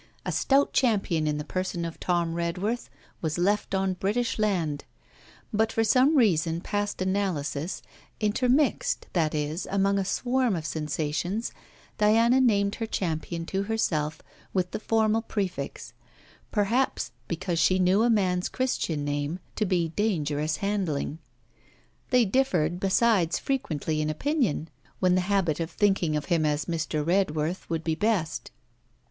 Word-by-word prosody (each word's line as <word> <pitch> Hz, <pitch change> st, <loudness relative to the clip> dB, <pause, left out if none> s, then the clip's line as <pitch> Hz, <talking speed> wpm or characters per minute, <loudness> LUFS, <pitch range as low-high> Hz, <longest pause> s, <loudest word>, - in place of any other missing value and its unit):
A -, -, -1 dB
stout 275 Hz, +1 st, +2 dB
champion 195 Hz, -, +2 dB
in 150 Hz, 0 st, 0 dB
the 150 Hz, -, -3 dB
person 185 Hz, 0 st, -3 dB
of 165 Hz, -, -6 dB
Tom 170 Hz, -2 st, 0 dB
Redworth 180 Hz, +8 st, -2 dB, 0.3 s
was 160 Hz, -1 st, -1 dB
left 200 Hz, +3 st, +1 dB
on 190 Hz, 0 st, +1 dB
British 215 Hz, +6 st, -1 dB
land; 170 Hz, -9 st, 0 dB, 0.7 s
but 220 Hz, +1 st, +2 dB
for 225 Hz, -, +1 dB
some 255 Hz, +7 st, +4 dB
reason 170 Hz, -, +3 dB
past 205 Hz, +1 st, -2 dB
analysis, 180 Hz, -5 st, -2 dB, 0.4 s
intermixed, 255 Hz, -, +1 dB
that 160 Hz, -4 st, +1 dB
is, 150 Hz, +3 st, -2 dB
among 200 Hz, 0 st, +2 dB
a -, -, +1 dB
swarm 245 Hz, +3 st, +1 dB
of 160 Hz, -2 st, -4 dB
sensations, 155 Hz, -, -2 dB, 0.5 s
Diana 230 Hz, +4 st, +5 dB
named 200 Hz, -5 st, +3 dB
her 225 Hz, -, -1 dB
champion 165 Hz, -3 st, -3 dB
to 195 Hz, +3 st, -1 dB
herself 160 Hz, -8 st, -1 dB, 0.3 s
with 180 Hz, -1 st, 0 dB
the -, -, -3 dB
formal 220 Hz, 0 st, +2 dB
prefix: 200 Hz, -5 st, -4 dB, 0.6 s
perhaps 230 Hz, +5 st, +1 dB, 0.2 s
because 170 Hz, 0 st, -2 dB
she 185 Hz, -, +4 dB
knew 185 Hz, +3 st, +3 dB
a 240 Hz, -, +3 dB
man's 185 Hz, -5 st, +1 dB
Christian 170 Hz, -, -1 dB
name 145 Hz, +3 st, -2 dB, 0.2 s
to 215 Hz, -, 0 dB
be 175 Hz, -3 st, +1 dB
dangerous 155 Hz, -6 st, 0 dB
handling. 170 Hz, -7 st, -1 dB, 0.9 s
They 250 Hz, -2 st, +4 dB
differed 180 Hz, -8 st, +1 dB
besides 195 Hz, -3 st, +3 dB
frequently 160 Hz, -, -2 dB
in 155 Hz, -, -1 dB
opinion, 200 Hz, -, 0 dB, 0.3 s
when 185 Hz, -1 st, +3 dB
the 185 Hz, -, +3 dB
habit 180 Hz, -5 st, +1 dB
of 165 Hz, -1 st, -2 dB
thinking 190 Hz, -4 st, +1 dB
of 150 Hz, -1 st, -2 dB
him 165 Hz, 0 st, +1 dB
as 150 Hz, -1 st, 0 dB
Mr. 160 Hz, -3 st, -2 dB
Redworth 170 Hz, -1 st, 0 dB
would 165 Hz, -1 st, -2 dB
be 160 Hz, -, 0 dB
best. 190 Hz, -3 st, -1 dB
185 Hz, 140 wpm, -27 LUFS, 160-215 Hz, 0.9 s, Diana